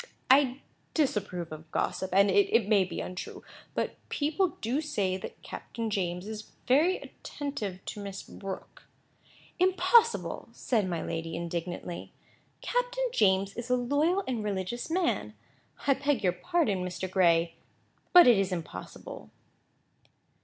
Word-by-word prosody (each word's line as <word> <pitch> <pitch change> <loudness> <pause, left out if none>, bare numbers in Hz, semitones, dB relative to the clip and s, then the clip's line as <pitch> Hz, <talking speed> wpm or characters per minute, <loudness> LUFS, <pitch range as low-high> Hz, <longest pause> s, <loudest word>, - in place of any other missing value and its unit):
"I 270 -1 +5 0.3
disapprove 200 - 0
of 155 0 -9
gossip, 190 +3 -1
and 200 +2 +5
it 385 - +4
may 205 -3 +5
be 175 -2 -5
untrue; 180 0 -6 0.3
but - - -1
people 320 +5 0
do 250 +7 0
say 200 -11 -1
that 190 - -8
Captain 230 -2 -5
James 180 -2 -1
is 215 0 -7
very 310 +9 +4
attentive 210 -10 -6
to - - -6
Miss 195 -1 -6
Brooke." 195 -1 -8 0.7
"Impossible!" 375 +6 +3
said 215 -7 0
my 170 -2 -2
lady, 165 0 -4
indignantly. 170 +1 -4 0.5
"Captain - - 0
James 195 - +3
is 240 +1 -6
a 250 - +4
loyal 290 +10 +1
and 240 -4 -1
religious 205 - -3
man. 330 - 0 0.5
I 275 - +5
beg 280 -4 0
your 180 -2 +3
pardon 215 - 0
Mr. 180 0 -3
Gray, 170 -3 +3 0.6
but 355 -1 +10
it 235 -5 +7
is 195 -1 0
impossible." 170 -3 -7
210 Hz, 130 wpm, -29 LUFS, 185-290 Hz, 0.7 s, but